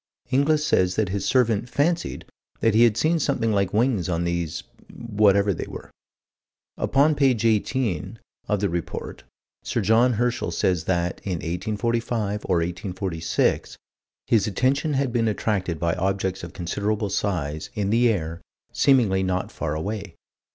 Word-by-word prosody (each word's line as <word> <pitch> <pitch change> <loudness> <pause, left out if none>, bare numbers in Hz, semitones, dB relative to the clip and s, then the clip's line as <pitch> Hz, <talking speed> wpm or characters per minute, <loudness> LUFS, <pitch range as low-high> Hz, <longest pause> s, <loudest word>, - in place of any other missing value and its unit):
Inglis 150 +3 +2
says 90 -9 +2
that 110 -4 0
his 100 +1 -2
servant 120 -2 +2
"fancied" 165 +6 -1 0.3
that 115 - +2
he 115 +2 +6
had 115 -2 +2
seen 165 +4 +2
something 135 -6 0
like 100 -3 +1
wings 110 -5 +1
on 85 -1 0
these 85 -2 -2 0.3
whatever 105 -3 +2
they - - -5
were. - - -9 0.8
Upon 145 +3 +3
page 130 -6 +2
18, 110 - 0 0.3
of 105 -2 0
the 100 - +2
Report, 85 0 -5 0.4
Sir - - -2
John 120 +3 +4
Herschel 120 +2 0
says 90 -3 0
that, 90 -1 -1
in 95 - -2
1845 105 +4 -2
or 90 - +3
1846, 90 -1 -2 0.5
his 110 -4 +2
attention 135 +7 +1
had 135 -3 0
been 115 -2 +1
attracted 100 -5 -1
by 85 -1 +1
objects 95 0 -1
of 85 - -7
considerable 100 +4 -2
size, 80 -7 -2
in 100 -2 -1
the 120 +2 +4
air, 85 -5 -2 0.3
seemingly 115 -9 +3
not 95 -1 -1
far 75 -2 -3
away. 100 +2 -4
105 Hz, 145 wpm, -24 LUFS, 90-120 Hz, 0.8 s, he